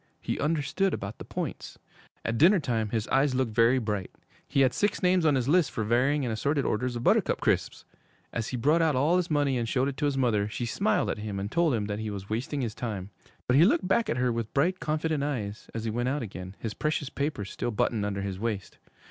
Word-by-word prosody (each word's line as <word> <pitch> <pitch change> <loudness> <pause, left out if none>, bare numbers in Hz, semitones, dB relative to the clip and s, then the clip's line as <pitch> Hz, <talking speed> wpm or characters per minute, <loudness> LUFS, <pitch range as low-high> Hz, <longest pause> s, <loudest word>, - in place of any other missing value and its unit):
He - - -3
understood 155 +5 0
about 100 +2 -7
the - - -6
points. - - -5 0.5
At 115 0 -1
dinner 180 +6 +6
time 115 -7 -1
his 110 0 -2
eyes 135 0 +2
looked 125 -4 0
very 115 +3 +4
bright. 105 -6 -2 0.4
He 140 - +2
had 130 -2 +4
six 205 +3 0
names 180 -2 +4
on 145 - +4
his 130 -2 0
list 170 +2 +4
for 110 - -3
varying 130 +6 +2
and 120 - -1
assorted 140 +5 0
orders 125 +3 -1
of 120 - -4
Buttercup - - +3
Crisps! - - 0 0.5
As 115 -2 -2
he 125 - -3
brought 150 +8 +3
out 160 -3 +2
all 150 +7 +3
his 180 -2 -1
money 145 -4 +1
and 115 -1 -2
showed 130 +1 +1
it 140 -2 -4
to 150 - 0
his 140 -2 0
mother, 110 -6 +2
she 120 +3 -4
smiled 200 - +1
at - - -5
him 105 -2 -4
and 100 +2 -4
told 170 -6 +2
him 105 -2 -1
that 105 0 -3
he 110 0 -3
was 100 0 -7
wasting 130 +6 -2
his 115 -4 -2
time. 105 -5 -5 0.3
But 125 - +3
he 155 - +7
looked 240 - +3
back 230 +4 +2
at - - 0
her 125 -1 +2
with 115 -1 -3
bright, 175 +7 +2
confident 155 0 -1
eyes, 110 -8 -4
as 115 - -3
he 115 - -2
went 120 +3 -1
out 140 0 -1
again, 95 -2 -8
his 110 -2 -4
precious 150 -2 -2
papers 140 -9 -3
still - - -3
buttoned 110 -1 0
under 100 -1 -2
his 95 -1 -4
waist. 105 -3 -4
125 Hz, 240 wpm, -28 LUFS, 110-150 Hz, 0.5 s, he